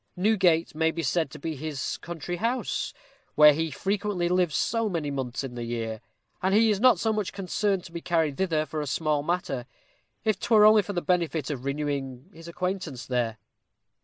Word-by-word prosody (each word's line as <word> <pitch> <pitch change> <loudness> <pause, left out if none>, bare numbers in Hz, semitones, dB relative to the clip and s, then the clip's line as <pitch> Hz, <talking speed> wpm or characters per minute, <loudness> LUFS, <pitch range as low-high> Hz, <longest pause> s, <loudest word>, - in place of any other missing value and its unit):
Newgate 180 -4 +2
may 160 +1 +2
be 165 +1 -3
said 160 +3 +1
to - - -10
be 160 +2 -4
his 145 -1 -4
country 175 +1 -5
house, 235 +6 -1 0.4
where 150 -1 +8
he 160 +2 -1
frequently 195 +3 -1
lives 180 -4 +1
so 230 -1 +1
many 160 -6 -2
months 130 -1 -3
in 130 -2 -6
the 120 -1 -5
year; 115 -2 -4 0.4
and 190 +2 +2
he 220 0 +5
is 200 - 0
not 240 -5 +5
so 220 -1 +1
much 210 -6 -2
concerned 195 +1 -1
to - - -11
be 170 0 -6
carried 165 -5 +1
thither 160 -4 0
for 155 +1 -4
a 150 - -4
small 150 +1 0
matter, 145 -6 -2 0.6
if 215 -3 +1
'twere 215 -3 +5
only 215 0 +7
for 200 +1 -6
the 175 - -2
benefit 165 -5 0
of 135 -2 -5
renewing 140 +1 -3
his 165 +1 -12
acquaintance 180 -7 -4
there. 120 -3 -1
165 Hz, 190 wpm, -27 LUFS, 145-195 Hz, 0.6 s, where